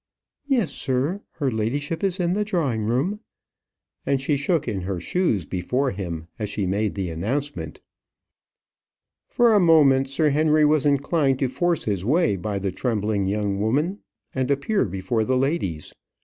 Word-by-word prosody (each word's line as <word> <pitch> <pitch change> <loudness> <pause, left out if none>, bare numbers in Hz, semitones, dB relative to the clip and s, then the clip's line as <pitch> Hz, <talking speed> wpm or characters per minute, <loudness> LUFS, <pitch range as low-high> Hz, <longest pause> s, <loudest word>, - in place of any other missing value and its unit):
"Yes, 245 - +1
sir; 140 +9 -1
her 140 -4 -1
ladyship 145 - -2
is 190 -1 0
in 175 0 +1
the 210 +2 +1
drawing 150 - -1
room," 135 - 0 0.8
and 140 -1 +1
she 140 +2 0
shook 145 +2 0
in 100 -5 -2
her 90 0 -3
shoes 110 - 0
before 125 - -1
him 85 -4 -5
as 105 -2 -2
she 100 -1 -2
made 100 +3 -1
the 95 -4 -3
announcement. 135 - -3 1.5
For 240 -2 +3
a 210 - +5
moment 145 -6 +5
Sir 150 +2 +2
Henry 155 +1 +3
was 150 -1 +3
inclined 140 -1 +2
to 135 - 0
force 170 +6 0
his 100 -4 -2
way 130 - +2
by 100 +2 -3
the 95 -1 -2
trembling 105 -2 -1
young 100 0 -1
woman, 150 - 0 0.3
and 130 0 -1
appear 145 +10 +1
before 95 +4 -1
the 130 +3 +1
ladies. 130 - -2
135 Hz, 160 wpm, -23 LUFS, 105-155 Hz, 1.5 s, a